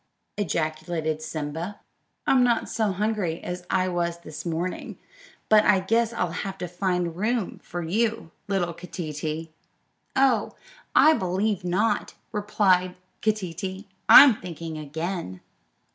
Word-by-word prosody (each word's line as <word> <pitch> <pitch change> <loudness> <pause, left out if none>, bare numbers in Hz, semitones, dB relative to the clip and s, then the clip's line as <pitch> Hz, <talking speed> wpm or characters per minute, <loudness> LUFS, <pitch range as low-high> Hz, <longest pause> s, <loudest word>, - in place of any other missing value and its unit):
ejaculated 155 -4 -2
Simba; 160 +5 -5 0.5
"I'm 255 -2 +4
not 240 -2 +2
so 215 -3 0
hungry 195 -4 -1
as 180 0 -6
I 185 0 +2
was 170 -1 -1
this 155 -1 -8
morning, 170 +2 -3 0.5
but 215 -1 +6
I 205 -3 +5
guess 225 +4 +1
I'll 180 -7 -1
have 195 +2 -4
to 180 - -4
find 180 -1 -1
room 215 +2 -1
for 175 -1 -5
you, 220 +1 -1 0.2
little 185 -4 0
Keeteetee." 160 -2 -5 0.7
"Oh, 260 -5 +3 0.4
I 315 - +7
believe 190 - 0
not," 180 +5 0 0.2
replied 190 -4 +2 0.3
Keeteetee; 190 -2 -2 0.2
"I'm 270 -7 +9
thinking 165 -2 -6
again." 155 - -4
180 Hz, 120 wpm, -25 LUFS, 165-210 Hz, 0.7 s, I'm